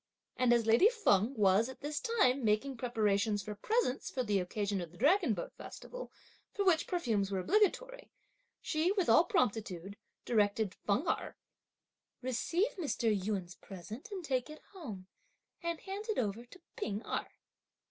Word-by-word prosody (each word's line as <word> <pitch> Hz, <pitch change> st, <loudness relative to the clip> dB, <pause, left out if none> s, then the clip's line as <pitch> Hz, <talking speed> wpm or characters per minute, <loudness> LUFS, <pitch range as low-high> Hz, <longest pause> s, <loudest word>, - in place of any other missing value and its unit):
And 250 Hz, -1 st, +3 dB
as 235 Hz, -2 st, +4 dB
lady 230 Hz, -, +6 dB
Feng 270 Hz, -, +2 dB
was, 210 Hz, +2 st, +4 dB
at 260 Hz, -, -10 dB
this 290 Hz, 0 st, -2 dB
time, 280 Hz, -, +2 dB
making 220 Hz, +6 st, +1 dB
preparations 215 Hz, -4 st, 0 dB
for 210 Hz, -, -5 dB
presents 355 Hz, -, 0 dB
for 255 Hz, -, -2 dB
the 205 Hz, -4 st, +1 dB
occasion 200 Hz, +1 st, -2 dB
of 170 Hz, -, -6 dB
the 175 Hz, -, -16 dB
dragon 300 Hz, -, +3 dB
boat 175 Hz, -, -6 dB
festival, -, -, -8 dB, 0.4 s
for 400 Hz, -, 0 dB
which 335 Hz, -4 st, +3 dB
perfumes 225 Hz, -, 0 dB
were 195 Hz, -, -2 dB
obligatory, 430 Hz, -, +1 dB, 0.5 s
she, 320 Hz, +3 st, +1 dB
with 380 Hz, -4 st, 0 dB
all 335 Hz, -, +6 dB
promptitude, 200 Hz, -5 st, -1 dB, 0.3 s
directed 210 Hz, -3 st, +1 dB
Feng 225 Hz, -, +1 dB
Erh: -, -, -1 dB, 0.9 s
"Receive 330 Hz, -, 0 dB
Mr. 235 Hz, -9 st, +1 dB
Yün's 190 Hz, -2 st, -3 dB
present 205 Hz, -, -10 dB
and 380 Hz, -5 st, -6 dB
take 260 Hz, -1 st, -1 dB
it 305 Hz, -, -11 dB
home 225 Hz, -, -8 dB, 0.6 s
and 340 Hz, -1 st, -2 dB
hand 395 Hz, +2 st, -6 dB
it 435 Hz, -, 0 dB
over 225 Hz, 0 st, -1 dB
to 305 Hz, +10 st, -15 dB, 0.2 s
P'ing 220 Hz, -, -3 dB
Erh. -, -, -2 dB
240 Hz, 160 wpm, -33 LUFS, 205-340 Hz, 0.9 s, lady